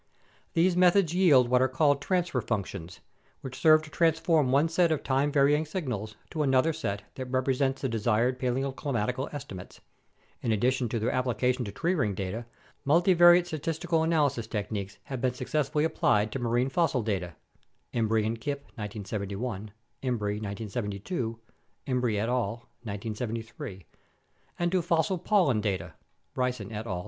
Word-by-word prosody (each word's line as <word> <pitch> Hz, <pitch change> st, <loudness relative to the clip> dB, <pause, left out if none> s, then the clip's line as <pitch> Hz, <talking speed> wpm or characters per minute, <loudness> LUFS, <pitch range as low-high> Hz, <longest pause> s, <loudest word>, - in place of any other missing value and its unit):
These 175 Hz, +1 st, +3 dB
methods 180 Hz, -1 st, +4 dB
yield 155 Hz, -9 st, +5 dB
what 125 Hz, +1 st, +3 dB
are 130 Hz, -, +4 dB
called 140 Hz, +2 st, +2 dB
transfer 180 Hz, +1 st, 0 dB
func 105 Hz, -5 st, -1 dB
tions, 90 Hz, -2 st, -9 dB, 0.4 s
which 130 Hz, -1 st, -7 dB
serve 155 Hz, +2 st, +6 dB
to 155 Hz, -, -12 dB
transform 160 Hz, -4 st, +2 dB
one 140 Hz, +4 st, +4 dB
set 170 Hz, 0 st, +2 dB
of 155 Hz, -, 0 dB
time 135 Hz, +2 st, +1 dB
varying 145 Hz, +2 st, +3 dB
signals 125 Hz, -, -4 dB, 0.2 s
to 155 Hz, -, -2 dB
another 135 Hz, +3 st, +3 dB
set 100 Hz, -10 st, -3 dB
that 130 Hz, -1 st, -6 dB
represents 130 Hz, +1 st, 0 dB
the -, -, +2 dB
desired 120 Hz, +2 st, +1 dB
paleoclimatic 130 Hz, -1 st, -1 dB
estimates. 130 Hz, -11 st, -8 dB, 0.6 s
In 115 Hz, -, 0 dB
addition 125 Hz, +3 st, +1 dB
to 115 Hz, -, -1 dB
their 110 Hz, +1 st, 0 dB
application 125 Hz, 0 st, 0 dB
to 100 Hz, -, -5 dB
tree 170 Hz, -, 0 dB
ring 105 Hz, -, 0 dB
data, 100 Hz, +5 st, -4 dB, 0.4 s
multivariate 175 Hz, +3 st, +6 dB
statistical 165 Hz, 0 st, -1 dB
analysis 145 Hz, -8 st, +1 dB
techniques 100 Hz, -2 st, -4 dB
have 130 Hz, -3 st, -6 dB
been 130 Hz, -1 st, 0 dB
successfully 150 Hz, +2 st, 0 dB
applied 110 Hz, -9 st, +2 dB
to 135 Hz, -, -3 dB
marine 120 Hz, +2 st, +1 dB
fossil 140 Hz, -5 st, +1 dB
data 90 Hz, -6 st, -2 dB, 0.6 s
(Imbrie 110 Hz, -2 st, +1 dB
and 110 Hz, +1 st, -2 dB
Kipp, 140 Hz, -1 st, -3 dB, 0.2 s
1971; 105 Hz, +1 st, -4 dB, 0.3 s
Imbrie, 105 Hz, -5 st, -1 dB
1972; 110 Hz, -, -4 dB, 0.5 s
Imbrie 125 Hz, -5 st, 0 dB
et 110 Hz, -, 0 dB
al., 120 Hz, -1 st, -1 dB, 0.2 s
1973) 110 Hz, -2 st, -5 dB, 0.7 s
and 175 Hz, 0 st, 0 dB
to 185 Hz, -1 st, +2 dB
fossil 165 Hz, +2 st, +1 dB
pollen 175 Hz, -, +2 dB
data 90 Hz, -5 st, -2 dB, 0.4 s
(Bryson 125 Hz, -5 st, -2 dB
et 110 Hz, +1 st, -5 dB
al. 90 Hz, -4 st, -2 dB
125 Hz, 150 wpm, -28 LUFS, 110-155 Hz, 0.7 s, serve